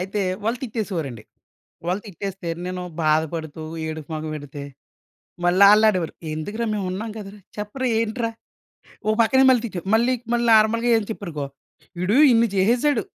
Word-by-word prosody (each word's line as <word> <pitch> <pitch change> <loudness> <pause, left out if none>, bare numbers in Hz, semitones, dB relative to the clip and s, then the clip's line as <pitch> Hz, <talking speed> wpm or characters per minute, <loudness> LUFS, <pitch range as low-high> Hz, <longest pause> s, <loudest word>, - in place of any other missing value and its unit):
అయితే, 195 +3 -2 0.2
వాళ్ళు 230 +3 0
తిట్టేసేవారండి. 175 - -4 0.6
వాళ్ళు 185 +4 -1
తిట్టేస్తే 195 -1 -6 0.2
నేను 180 0 -4 0.2
బాధపడుతూ, 160 0 0 0.2
ఏడుపు 155 -1 -6
మొహం 155 0 -4
ఎడితే, 145 0 -9 0.8
మళ్ళా 185 +3 +6
ఆల్లానేవారు. 210 -6 +3 0.2
"ఎందుకురా 205 +9 -3
మేమున్నాం 200 +2 -3
కదరా! 205 0 -9 0.2
చెప్పరా! 230 +5 -3
ఏంట్రా?" 230 +1 -1 0.8
ఓ - - +3
పక్కనే 265 +4 +5
మళ్ళీ 245 -3 +4
తిట్టే 190 -5 -5
మళ్ళీ, 235 +3 +3 0.2
మళ్ళీ 240 0 +1
నార్మల్‌గా 225 +2 +4
ఏం 220 - 0
చెప్పారనుకో 160 -10 -5 0.5
"వీడు 190 +7 +1 0.2
ఇన్ని 230 0 +4
చేసేసాడు. 240 +9 +3
200 Hz, 130 wpm, -23 LUFS, 165-225 Hz, 0.8 s, మళ్ళా